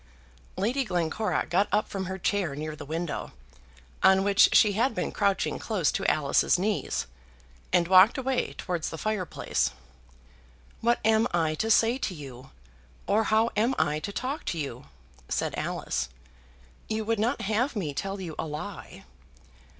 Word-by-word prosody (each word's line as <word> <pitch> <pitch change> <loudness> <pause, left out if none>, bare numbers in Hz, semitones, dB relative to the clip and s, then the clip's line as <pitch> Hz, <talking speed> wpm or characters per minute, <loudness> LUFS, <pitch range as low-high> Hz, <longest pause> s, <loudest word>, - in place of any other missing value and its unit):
Lady 240 +8 +1
Glencora 180 0 -1
got 195 +4 +2
up 210 +1 +2
from 195 -1 -4
her 190 +1 -4
chair 190 -5 -1
near 155 +1 -5
the 145 - -10
window, 165 +1 -4 0.7
on 190 0 +5
which 200 0 +5
she 210 -2 +5
had 230 +3 +1
been - - -2
crouching 200 -2 0
close 190 -9 0
to - - -2
Alice's 145 +3 +2
knees, 205 +3 -1 0.7
and 170 -1 +3
walked 190 +4 +7
away 265 -1 -1
towards 175 -3 -3
the 160 - -6
fireplace. 210 -1 -1 1.1
"What 235 +1 +2
am 220 +1 +4
I 160 -2 +1
to 220 +8 -2
say 230 +3 +4
to 190 - -3
you, 135 -3 -10 0.6
or 215 +2 +2
how 220 +2 +2
am 230 +5 +2
I 150 +1 +1
to 200 - -5
talk 270 +8 -3
to 170 - -2
you?" 135 -4 -5 0.4
said - - -1
Alice. 65 -1 -2 0.8
"You 220 0 -2
would 225 -1 0
not 240 +6 0
have 225 +6 0
me 165 -9 -2
tell 195 +6 -4
you 175 -4 -6
a - - -2
lie?" 150 0 -7
195 Hz, 160 wpm, -27 LUFS, 160-220 Hz, 1.1 s, walked